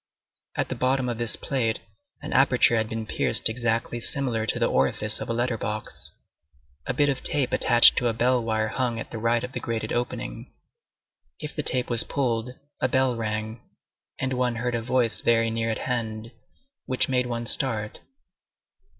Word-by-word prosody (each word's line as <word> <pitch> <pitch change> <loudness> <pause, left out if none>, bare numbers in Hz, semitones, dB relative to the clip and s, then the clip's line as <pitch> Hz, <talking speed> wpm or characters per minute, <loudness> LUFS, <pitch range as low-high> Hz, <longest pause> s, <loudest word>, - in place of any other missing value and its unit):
At - - -1
the - - -2
bottom 130 0 +1
of 120 -1 -3
this 120 -1 +2
plate, 115 -5 -1 0.5
an - - -5
aperture 130 -3 +4
had 110 -1 0
been 110 -1 -4
pierced - - +3
exactly 120 0 -1
similar 120 -3 0
to - - +2
the - - +1
orifice 70 +11 +1
of - - -5
a - - 0
letter 120 0 -1
box. 105 +1 -4 0.8
A - - -1
bit 145 - +3
of 135 -2 -1
tape 140 -4 0
attached 120 -1 +7
to 125 - +2
a 115 - 0
bell 125 +2 +1
wire 110 -1 -1
hung 120 -1 -2
at - - -8
the 115 - -5
right 115 +1 +1
of 125 - -5
the - - -5
grated 115 -2 -4
opening. 120 - -4 0.9
If 150 0 -7
the 150 - 0
tape 125 -4 -1
was 115 -1 +3
pulled, 125 -2 -2 0.3
a 130 - +3
bell 130 -1 +1
rang, 110 0 -4 0.6
and 130 -1 -2
one 125 -1 0
heard 120 +1 -2
a 115 - -1
voice 120 -1 0
very 115 -1 +2
near 115 0 -1
at 110 - -1
hand, 115 -2 -4 0.6
which 130 -1 +1
made 125 -1 0
one 120 -1 -4
start. 110 -4 0
120 Hz, 185 wpm, -25 LUFS, 110-125 Hz, 0.9 s, attached